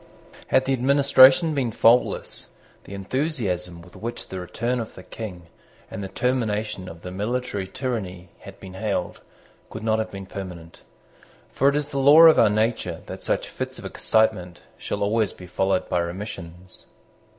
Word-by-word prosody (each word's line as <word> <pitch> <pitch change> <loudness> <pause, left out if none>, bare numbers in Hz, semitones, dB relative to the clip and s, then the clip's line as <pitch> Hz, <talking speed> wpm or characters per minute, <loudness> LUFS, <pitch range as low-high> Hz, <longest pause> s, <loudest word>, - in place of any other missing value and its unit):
Had 130 - +3
the 135 - +1
administration 135 +3 +5
been 130 -5 -1
faultless, 115 +3 +2 0.3
the 100 - -8
enthusiasm 95 - -2
with 90 - -17
which 120 +2 -6
the 95 - -5
return 120 +7 -2
of 115 - -6
the - - -11
King 95 -6 -8 0.5
and 100 - -5
the - - -4
termination 110 -5 -2
of 85 0 -12
the 90 - -6
military 105 0 -3
tyranny 95 -7 -5
had 100 0 -12
been 95 -1 -10
hailed 100 -2 -3 0.5
could 110 - -8
not 110 0 +1
have 110 0 -2
been 100 -2 -8
permanent. 90 -4 -9 0.7
For 135 - +3
it 140 - -1
is 150 0 -1
the 140 - -3
law 145 +4 +8
of 165 -1 +8
our 110 - +6
nature 110 +2 -1
that - - -8
such - - -1
fits - - -5
of - - -8
excitement 105 -6 0
shall 100 - -4
always 110 0 +1
be 90 - -12
followed 95 +1 0
by 90 - 0
remissions. 90 0 -7
105 Hz, 165 wpm, -24 LUFS, 95-125 Hz, 0.7 s, law